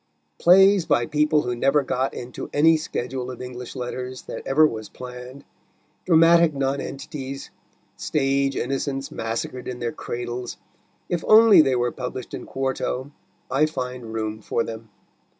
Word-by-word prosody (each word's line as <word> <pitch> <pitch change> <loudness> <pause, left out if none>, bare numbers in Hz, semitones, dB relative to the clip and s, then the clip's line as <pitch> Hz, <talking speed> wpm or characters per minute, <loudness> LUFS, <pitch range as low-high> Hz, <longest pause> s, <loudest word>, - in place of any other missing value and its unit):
Plays 190 +1 +6
by 120 - +2
people 150 +2 +2
who 125 0 -2
never 135 +4 +2
got 130 0 -1
into 125 0 -7
any 160 +3 +5
schedule 130 -4 -4
of 125 - -8
English 125 0 -8
letters 125 0 -5
that - - -7
ever 155 +4 +5
was 110 -7 -3
planned, 125 +2 -10 0.6
dramatic 165 -2 +5
nonentities, 135 0 -4 0.5
stage 135 -1 0
innocents 135 +1 -2
massacred 115 +3 -4
in 125 - -4
their 120 -1 -3
cradles, 120 0 -5 0.5
if 175 -2 -2
only 220 -3 +8
they 135 -4 +2
were 120 0 0
published 125 0 -6
in - - -6
quarto 130 0 -3 0.4
I 150 +4 +3
find 125 -5 -5
room 110 -1 -3
for 115 - -1
them. 115 -1 -8
130 Hz, 140 wpm, -23 LUFS, 125-150 Hz, 0.6 s, only